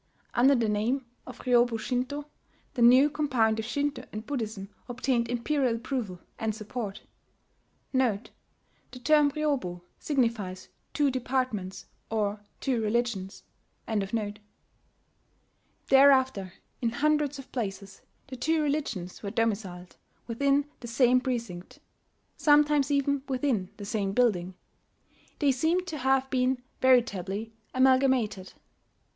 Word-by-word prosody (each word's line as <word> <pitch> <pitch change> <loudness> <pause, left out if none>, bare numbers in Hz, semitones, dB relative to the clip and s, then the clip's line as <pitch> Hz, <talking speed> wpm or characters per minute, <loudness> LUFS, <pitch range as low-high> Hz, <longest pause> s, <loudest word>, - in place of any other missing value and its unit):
Under 265 +4 +5
the 235 -3 +1
name 225 +6 0 0.2
of - - -9
Ryobu 240 -2 +3
Shinto,* 255 +5 -2 0.5
the 250 - -3
new 255 +4 +7
compound 250 -8 +1
of 220 - -3
Shinto 285 +4 -2
and 215 +1 -6
Buddhism 215 -7 -4 0.2
obtained 245 -1 0
imperial 245 0 0
approval 235 -6 -4 0.2
and 220 -1 -1
support. 215 -1 -6 0.9
[*The 245 -5 +1 0.8
term 300 -1 +5
"Ryobu" 280 - -2 0.2
signifies 230 -10 -1 0.3
"two 290 -2 +3
departments" 250 -7 -2 0.2
or 210 -2 -1 0.2
"two 255 -4 0
religions."] 215 -3 -2 2.4
Thereafter, 260 -8 +4 0.3
in 235 - +1
hundreds 295 +2 +1
of 270 - -11
places, 200 -5 -5 0.2
the 260 - -8
two 320 +6 +1
religions 280 - -3
were 200 - -4
domiciled 200 -5 -2 0.3
within 280 +4 +1
the 240 - -8
same 250 +1 +3
precinct 230 -9 -4 0.6
sometimes 295 -2 +4
even 280 -1 +1
within 250 -8 0
the 205 - -7
same 200 -2 -1
building: 190 -7 +1 0.8
they 285 -3 +3
seemed 320 +8 +1
to 315 -5 -5
have 265 0 +2
been 255 0 +1 0.2
veritably 225 -4 +2 0.2
amalgamated. 255 -7 +2
245 Hz, 110 wpm, -28 LUFS, 215-275 Hz, 2.4 s, new